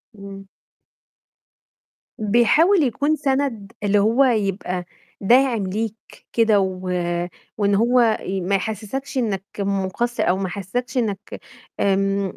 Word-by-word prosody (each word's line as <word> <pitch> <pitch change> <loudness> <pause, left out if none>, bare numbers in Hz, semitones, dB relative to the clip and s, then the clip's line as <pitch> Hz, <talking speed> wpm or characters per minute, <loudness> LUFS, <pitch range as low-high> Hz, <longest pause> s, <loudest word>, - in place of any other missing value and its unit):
إمم. 195 -1 -10 1.7
بيحاول 240 - +4
يكون 285 +5 +1
سَند 265 -8 -1
اللي 205 0 +3
هو 225 +6 +4
يبقى 195 -7 0 0.4
داعم 240 +1 +3
ليك 215 +3 -2 0.4
كده 225 -3 +4
و 190 -1 -1 0.8
وإن 200 -1 +2
هو 240 +4 +3
آآ 215 -4 +1
ما 190 +3 0
يحسسكش 220 +8 -4
إنك 210 -6 -1 0.2
مُقصّر 200 +4 -1
أو 185 - +2
ما 190 -1 -2
يحسسكش 245 +8 -4
إنّك 210 -4 -3 0.4
آمم 195 0 +1
210 Hz, 110 wpm, -21 LUFS, 195-245 Hz, 1.7 s, بيحاول